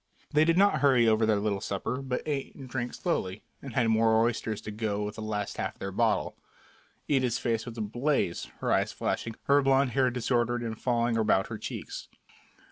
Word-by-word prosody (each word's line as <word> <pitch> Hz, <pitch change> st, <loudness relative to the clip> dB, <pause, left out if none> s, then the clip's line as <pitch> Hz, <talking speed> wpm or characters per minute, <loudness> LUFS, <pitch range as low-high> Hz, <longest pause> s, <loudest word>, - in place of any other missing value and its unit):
They 155 Hz, 0 st, +4 dB
did 165 Hz, +1 st, +3 dB
not 200 Hz, -5 st, +4 dB
hurry 130 Hz, -5 st, +5 dB
over 110 Hz, 0 st, +3 dB
their 110 Hz, -, +4 dB
little 100 Hz, -1 st, -1 dB
supper, 110 Hz, +6 st, -3 dB
but 130 Hz, -2 st, -3 dB
ate 145 Hz, -3 st, -3 dB
and 135 Hz, -, -9 dB
drank 120 Hz, -1 st, -3 dB
slowly, 100 Hz, -, -2 dB, 0.2 s
and 135 Hz, -4 st, -8 dB
had 125 Hz, -3 st, +3 dB
more 110 Hz, 0 st, +4 dB
oysters 115 Hz, -2 st, 0 dB
to 110 Hz, -, -6 dB
go 105 Hz, -1 st, -2 dB
with 105 Hz, 0 st, -4 dB
the 110 Hz, -, -8 dB
last 105 Hz, -1 st, -3 dB
half -, -, -3 dB
of -, -, -30 dB
their 95 Hz, -, -4 dB
bottle. -, -, +1 dB, 0.7 s
Ida's 130 Hz, -4 st, +2 dB
face 115 Hz, -1 st, -1 dB
was 120 Hz, -1 st, -7 dB
ablaze, 120 Hz, -, 0 dB, 0.2 s
her -, -, 0 dB
eyes -, -, +2 dB
flashing, 115 Hz, -1 st, -3 dB
her 140 Hz, +1 st, +4 dB
blond 135 Hz, -1 st, +3 dB
hair 130 Hz, -1 st, +3 dB
disordered 120 Hz, -1 st, 0 dB
and 110 Hz, -1 st, -5 dB
falling 120 Hz, -2 st, +1 dB
about 105 Hz, -3 st, +2 dB
her 110 Hz, -2 st, -5 dB
cheeks. -, -, -6 dB
120 Hz, 200 wpm, -29 LUFS, 110-135 Hz, 0.7 s, hurry